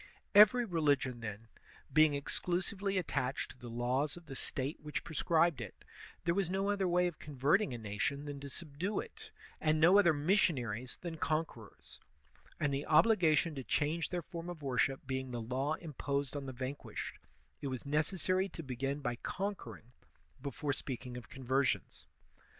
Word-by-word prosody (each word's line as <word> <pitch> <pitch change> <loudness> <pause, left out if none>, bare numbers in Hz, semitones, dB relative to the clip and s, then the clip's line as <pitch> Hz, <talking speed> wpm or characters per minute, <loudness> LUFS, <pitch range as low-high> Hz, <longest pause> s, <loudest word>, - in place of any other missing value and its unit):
Every 215 +4 +8
religion, 145 - +1
then, 115 -1 -6 0.5
being 155 0 +6
exclusively 185 +6 -1
attached 135 -7 -1
to - - -16
the 120 - -8
laws 125 +6 0
of 175 - -12
the 135 -3 -8
State 135 +3 -3
which 150 0 -3
prescribed 165 0 +2
it, - - -9 0.4
there 170 - +2
was 190 -2 +1
no 195 +2 +1
other 200 -2 +1
way 180 0 +3
of 175 -3 -3
converting 150 +8 +2
a 120 - -3
nation 115 +7 -2
than 145 -1 -5
to 140 0 -7
subdue 170 +7 -3
it, 460 - -8 0.3
and 155 0 +2
no 180 +6 +7
other 175 -5 +6
missionaries 145 - +1
than 170 -2 -5
conquerors; 155 -9 -3 0.6
and 145 -1 +1
the 140 +1 -2
obligation 165 -3 +5
to 135 -2 -5
change 155 +6 0
their 175 -2 -2
form 170 +1 -7
of 165 -4 -7
worship 135 0 +1
being 130 -1 -2
the 120 -1 -3
law 130 +6 -1
imposed 140 -3 -3
on 140 -1 -4
the - - -3
vanquished, 130 +2 -5 0.4
it 140 - -2
was 130 -1 -4
necessary 185 +6 +1
to 165 - -7
begin 135 +2 -2
by 120 -3 -2
conquering 125 - -5 0.5
before 140 +1 -2
speaking 130 -2 -5
of 120 -4 -8
conversions. 135 +1 -1
145 Hz, 160 wpm, -34 LUFS, 130-175 Hz, 0.6 s, Every